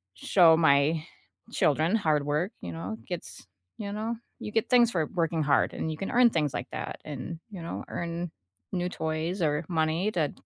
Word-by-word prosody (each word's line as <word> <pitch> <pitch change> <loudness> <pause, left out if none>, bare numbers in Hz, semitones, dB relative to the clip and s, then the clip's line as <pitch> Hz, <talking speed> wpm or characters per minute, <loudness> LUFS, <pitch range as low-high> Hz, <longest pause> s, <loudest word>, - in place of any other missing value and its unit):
show 165 - +5
my 155 0 +4 0.5
children 155 +7 +2
hard 155 -8 +2
work, 150 +7 0
you - - -5
know? 165 +7 -5
It - - -20
gets 175 - -6 0.3
you 200 -2 -4
know? 220 +3 -2 0.2
You 210 - -6
get 225 0 0
things 240 -2 +5
for 165 -6 +1
working 165 -2 0
hard, 145 -1 +3
and 160 - -2
you 155 - -5
can 195 - -4
earn 245 -1 +6
things 150 -6 0
like 125 - -4
that - - -5
and, 150 +3 -6
you 190 -4 -7
know, 165 - -5
earn 170 0 -4 0.4
new 180 -1 -1
toys 160 +2 -2
or 150 0 +1
money 165 +3 +1
that 160 -7 0
165 Hz, 190 wpm, -28 LUFS, 155-185 Hz, 0.5 s, earn